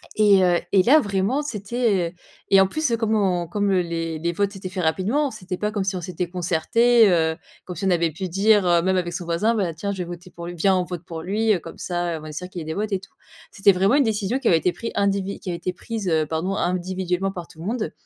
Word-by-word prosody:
Et 205 -3 +5
heu, 175 -1 +3
et 190 -2 +6
là 290 +9 +6
vraiment 200 +3 0
c'était 210 - -1 0.4
et 195 0 +7
en 190 - +4
plus, 310 +6 -1
heu, 230 - +2
comme 220 -1 0
on 180 -4 +1
comme, 205 +3 0
heu, 185 -2 +3
les 165 -2 -3
les 170 +2 -1
votes 200 +3 0
s'étaient 195 -2 -7
faits 185 -1 -4
rapidement, 220 - +1
c'était 185 -4 -6
pas 210 +2 -1
comme 205 -2 -1
si 190 0 -2
on 180 - -3
s'étaient 180 0 -4
concertés, 195 +7 +3
heu, 160 -3 +2 0.3
comme 180 - -7
si 185 - -4
on - - +3
avait 170 -2 +2
pu 185 +4 -5
dire, 200 +2 +3
heu, 170 -1 +4
même 190 +1 +2
avec 175 -1 -1
son 175 0 -5
voisin: 170 +8 +1
«Bah, 190 -6 -1
tiens 200 +6 -4
je - - -8
vais - - -1
voter 175 +1 -9
pour 170 -1 -9
lui 175 - -6
viens 190 +3 +3
on 180 - +1
vote 175 -1 -6
pour 165 -3 -6
lui, 215 +5 +1
heu, 185 - 0
comme - - -11
ça 175 -1 -2
heu, - - -4
on - - -10
va 155 - -8
être 150 - -9
sûrs 180 +3 -6
qu'il 180 -2 -6
ait - - -7
des 160 - -3
votes 210 +1 -2
et 195 - 0
tout». 195 +1 -17 0.4
C'était 200 0 +4
vraiment 195 +6 +2
une 285 - +5
décision 220 +1 0
qui 260 - -1
avait 165 - +5
été 180 +2 +1
pris 230 +5 -6
indivi 200 -1 0
qui - - -7
avait 175 - -2
été 180 +1 -3
prise 215 +2 -5
heu, 160 -2 +1
pardon 165 +5 -2
individuellement 185 +1 -1
par 175 -3 -7
tout 160 - -17
le 165 - -7
monde 225 +2 -2
185 Hz, 280 wpm, -23 LUFS, 175-205 Hz, 0.4 s, et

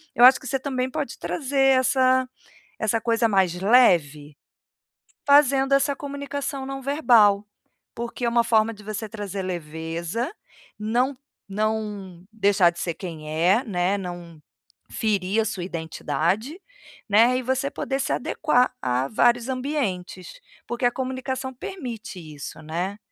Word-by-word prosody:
eu 240 - +4
acho 260 +1 +8
que 260 - -10
você 270 - 0
também 260 -1 -2
pode - - -4
trazer 270 -2 +2
essa 260 0 +3 0.5
essa 220 +1 0
coisa 230 0 +1
mais 190 -4 +2
leve, 155 - +3 0.9
fazendo 275 -1 +5
essa 275 0 +2
comunicação 280 -1 -5
não-verbal. 255 -7 +3 0.5
Porque 235 +1 -5
é - - +2
uma 235 0 +3
forma 225 -1 +2
de 210 0 -15
você 215 +1 -5
trazer 205 -3 -5
leveza, 170 - -4 0.5
não 245 +6 0 0.3
não 205 -3 -3
deixar 200 -5 +4
de 170 - -14
ser 170 -2 -2
quem 160 -5 -8
é, 180 - +2
né, 190 -2 0
não 175 -3 -8 0.5
ferir 205 -1 0
a - - -2
sua 195 -4 -4
identidade, 170 - -2 0.5
né, 230 +5 +5
e - - -3
você 260 +2 -1
poder 270 0 -3
se 270 - -1
adequar 255 -5 +1
a 125 +2 0
vários 240 +2 +2
ambientes, 255 - -3 0.3
porque 240 +1 -4
a - - +4
comunicação 260 0 -4
permite 250 - -7
isso, 155 -1 -9
né. 175 +6 -3
225 Hz, 135 wpm, -24 LUFS, 185-260 Hz, 0.9 s, acho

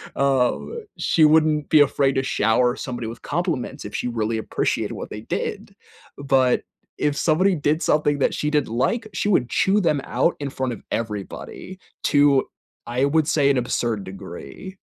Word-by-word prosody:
um, 140 - 0
she 160 - +2
wouldn't 155 -1 +3
be 155 - +6
afraid 140 -1 +3
to 135 - +1
shower 120 0 +2
somebody 120 -3 -5
with 115 0 -8
compliments - - -3
if - - -8
she - - -2
really 115 -1 -1
appreciated 110 - -1
what - - -7
they - - -7
did. - - -4 0.4
But, 135 -2 +2 0.3
if 145 -1 0
somebody 180 +6 +2
did 150 +1 0
something 145 -3 +2
that - - +2
she 150 - -1
didn't 150 -6 0
like, 220 - 0
she 180 +3 -1
would 125 - +2
chew 195 +2 +2
them 150 -7 +1
out 170 - +1
in 140 - -2
front 130 -2 -3
of - - -10
everybody, 115 - -5 0.2
to, 145 -2 +4 0.4
I 125 +3 0
would 155 +2 +2
say, 145 -3 +3
an 140 - +3
absurd 120 -3 -1
degree. 95 - -9
140 Hz, 170 wpm, -22 LUFS, 120-155 Hz, 0.4 s, be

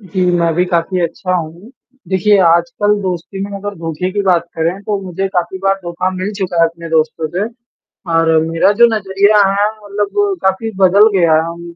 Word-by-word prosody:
जी, 185 -2 -2
मैं 170 -1 +1
भी 180 +2 +2
काफ़ी 180 +1 -1
अच्छा 180 +2 -3
हूँ, 170 +6 -5 0.4
देखिए 200 +2 +3
आजकल 170 +5 +2
दोस्ती 185 +1 -4
में 205 - -7
अगर 205 +1 -6
धोखे 165 +2 -3
की 205 0 -1
बात 180 -4 +2
करें, 165 +4 -1
तो 205 -1 -2
मुझे 190 +1 -3
काफ़ी 180 0 -2
बार 195 0 +3
धोखा 175 +1 -2
मिल 190 +3 -3
चुका 180 -3 -1
है - - +6
अपने 170 0 -10
दोस्तों 160 0 0
से, 180 +6 -2 0.7
और 165 0 +3 0.2
मेरा 165 +4 +2
जो 235 - +9
नज़रिया 200 +1 +2
है 200 +1 +1 0.2
मतलब 210 - -1
काफ़ी 190 +4 0
बदल 200 +3 +6
गया 160 -3 +4
अम, 170 0 -8
185 Hz, 185 wpm, -15 LUFS, 170-200 Hz, 0.7 s, जो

